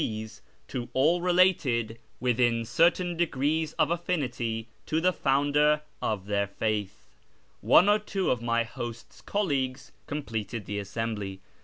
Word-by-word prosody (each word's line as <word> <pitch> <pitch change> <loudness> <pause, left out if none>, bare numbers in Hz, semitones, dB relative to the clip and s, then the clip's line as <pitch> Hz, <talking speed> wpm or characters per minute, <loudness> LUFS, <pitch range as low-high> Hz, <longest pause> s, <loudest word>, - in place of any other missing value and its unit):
s 110 -1 -5 0.3
to 125 -3 -5
all 160 +7 +3
related, 160 -11 +2 0.2
witliin 120 -2 +2
certain 175 +7 +2
degrees 155 -1 0
of 150 - +2
atlinity, 130 -10 -2 0.2
to 160 - +1
tlie 180 +2 +2
founder 145 +2 +2 0.2
of 100 -3 -2
tlieir 100 -1 0
faith. 105 -1 -3 0.6
One 180 - +6
or 210 +1 +5
two 200 -2 -1
of 125 - 0
my 115 0 +1
host's 115 0 -8
colleagues 140 -10 -2 0.2
completed 115 -6 -4
the 105 0 -3
assembly. 100 -1 -4
130 Hz, 130 wpm, -28 LUFS, 115-160 Hz, 0.6 s, One